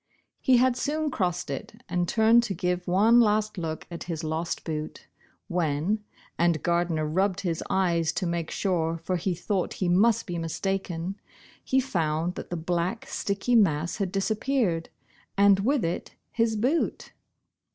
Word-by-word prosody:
He 255 -1 +4
had 255 0 +3
soon 300 +3 -1
crossed 175 - -1
it, 220 - -7
and 175 0 0
turned 225 +3 +5
to 200 -4 -3
give 180 0 -1
one 210 +7 +5
last 215 -3 +2
look 160 -2 -4
at 170 - -6
his 165 -2 -4
lost 160 +2 -2
boot, 155 -1 -5 0.4
when 170 +5 0 0.2
— - - -29
and 170 -2 +2
Gardner 170 -2 +1
rubbed 190 +5 0
his 170 -4 -2
eyes 170 -4 +2
to 185 - -2
make 170 -1 -2
sure, 165 -4 0
for 165 +3 -2
he 175 +1 -1
thought 185 +2 -2
he 185 - -2
must 200 +6 +3
be 175 -2 -4
mistaken 180 +2 -3 0.2
— - - -22 0.2
he 265 - +2
found 170 -8 -1
that - - -8
the 175 - -3
black, 175 +6 -2
sticky 200 +5 -2
mass 170 -8 +3
had 195 -4 -2
disappeared, 205 -3 0 0.5
and 200 -1 +6
with 245 +1 +1
it 165 - -4 0.2
his 230 -1 +1
boot 255 +10 0
180 Hz, 160 wpm, -27 LUFS, 170-215 Hz, 0.5 s, and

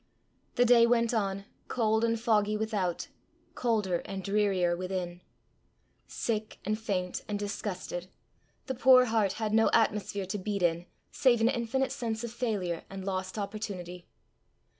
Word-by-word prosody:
The 245 - +4
day 235 -1 +6
went 235 0 +2
on, 200 -3 -1 0.2
cold 220 -2 +1
and 230 -1 +1
foggy 215 -2 +2
without, 210 -5 -2 0.5
colder 210 -7 0
and 195 -1 -5
drearier 195 -4 +2
within. 180 -1 -4 0.9
Sick 220 -2 -3
and 215 +2 -1
faint 185 -5 -2
and 210 - -2
disgusted, 200 -3 -4 0.6
the 265 - -2
poor 255 0 +6
heart 220 -4 +1
had 215 0 -2
no 225 0 +5
atmosphere 205 -3 +1
to 190 +3 -4
beat 200 0 -2
in 170 0 +1 0.2
save 245 -3 +3
an 225 +1 +4
infinite 250 +2 0
sense 230 -4 -3
of 235 - -4
failure 205 -8 -2
and 195 -1 -7
lost 185 0 -3
opportunity. 195 -4 -5
210 Hz, 140 wpm, -30 LUFS, 190-230 Hz, 0.9 s, day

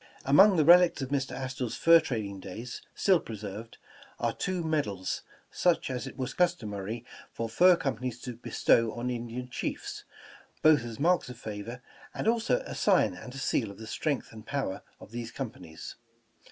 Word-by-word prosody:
' - - -25
' - - -27
Among 190 +8 +7
the 155 - +4
relics 175 -3 +6
of 130 - -5
Mr. 140 -1 -1
Astor's 130 -2 -4
fur 165 0 +7
trading 105 -9 -4
days, 115 +7 -7
still 190 -3 +4
preserved, 110 -1 -8 0.4
are - - 0
two 185 -2 -2
medals, 140 - -1 0.3
such 175 -6 +1
as 130 +1 -3
it 135 - -9
was 130 0 -3
customary 115 - -1 0.3
for 115 - -3
fur 180 +11 +6
companies 130 -5 -3
to 125 -2 -6
bestow 115 -1 +2
on 120 +1 -3
Indian 120 +1 -5
Chiefs, 125 - -5 0.6
both 155 -5 +6
as 115 -2 -7
marks 175 -1 +2
of 125 - -8
favor, 115 +3 -7 0.3
and - - -2
also 235 - +2
a - - -6
sign - - +3
and 125 - -10
a - - -6
seal 125 -4 0
of 100 - -10
the 110 - -9
strength 140 +4 -2
and 110 0 -12
power 135 -9 -2 0.2
of - - -13
these 120 -1 -5
companies. 90 - -7
125 Hz, 180 wpm, -29 LUFS, 110-155 Hz, 0.6 s, Among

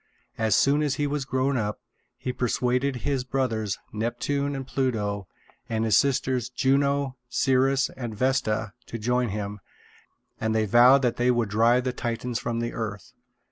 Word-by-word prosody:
As 110 -2 +3
soon 145 +2 +3
as 145 -3 0
he 145 - -1
was 145 -1 -2
grown 130 +1 0
up, 105 -2 -2 0.4
he 125 - -4
persuaded 125 +2 0
his 140 -3 0
brothers, 115 -6 -1 0.2
Neptune 140 +6 -1
and 135 -1 -5
Pluto, 105 -8 -1 0.4
and 110 -1 0
his 110 -3 +3
sisters, 130 -3 +1
Juno, 140 +1 +1
Ceres, 135 +1 +2
and 120 -4 -5
Vesta, 110 -5 0
to 115 - -5
join 125 +2 0
him; 105 0 -4 0.8
and 110 0 0
they 110 -1 +2
vowed 125 +6 +6
that 120 -2 +1
they 125 +1 +2
would 120 -3 +1
drive 115 +4 +3
the 125 -1 -2
Titans 120 0 -3
from 115 -1 -2
the 120 0 -3
earth. 105 -4 -5
125 Hz, 160 wpm, -26 LUFS, 110-135 Hz, 0.8 s, vowed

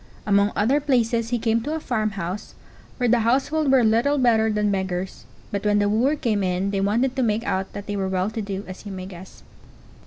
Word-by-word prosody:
Among 200 0 +3
other 250 +8 +2
places 235 -5 +1
he 240 - 0
came 230 0 +1
to 300 +6 -3
a - - -2
farmhouse, 210 - -3 0.4
where 245 - +1
the 240 +1 +4
household 270 +6 +1
were 265 -2 +5
little 230 +6 +3
better 225 -4 +3
than 210 -1 +1
beggars; 190 -1 -3 0.3
but 200 -1 -3
when 210 0 +2
the 205 0 +2
wooer 245 +8 +2
came 225 -8 0
in 185 +1 0
they 195 -1 -1
wanted 235 +6 +1
to 265 - 0
make 220 -1 +1
out 190 -3 -2
that 205 - -7
they 205 - -4
were 190 -1 -1
well 190 +2 -1
to 220 - -4
do, 200 -1 -4
as 185 - -9
you 205 - -7
may 185 -1 -6
guess. 185 0 -12
215 Hz, 220 wpm, -23 LUFS, 195-240 Hz, 0.4 s, were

